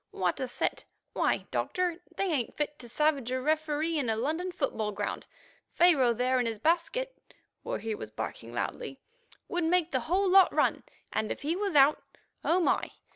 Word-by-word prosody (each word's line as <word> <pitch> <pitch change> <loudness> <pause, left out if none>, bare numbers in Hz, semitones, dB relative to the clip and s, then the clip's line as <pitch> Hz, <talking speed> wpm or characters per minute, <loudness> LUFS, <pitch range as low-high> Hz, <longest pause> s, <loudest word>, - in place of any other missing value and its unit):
what 180 -2 -1
a 260 - -2
set. 245 - -2 0.3
Why, - - +1
Doctor, 360 -1 -1
they - - -1
ain't 305 - -1
fit 295 0 -2
to 240 - -11
savage 285 -2 +1
a 255 0 -1
referee 310 +2 0
in 250 -5 -1
a 220 - +2
London 315 +10 -1
football 225 -10 -2
ground. 200 - -4 0.5
Pharaoh 300 -9 +5
there 250 +2 +1
in 245 - +1
his 225 -1 -3
basket 345 - 0 0.5
(where - - -3
he 220 +1 -3
was 110 - -6
barking 115 +1 -6
loudly) 135 +3 -4 0.5
would 350 0 -1
make 345 0 +2
the 260 - +1
whole 385 +3 +3
lot 380 0 +6
run, - - +2 0.3
and 215 0 -1
if - - -5
he 315 +4 0
was 395 -3 -2
out—oh 295 +4 +2
my! - - +1
295 Hz, 180 wpm, -29 LUFS, 240-345 Hz, 0.5 s, lot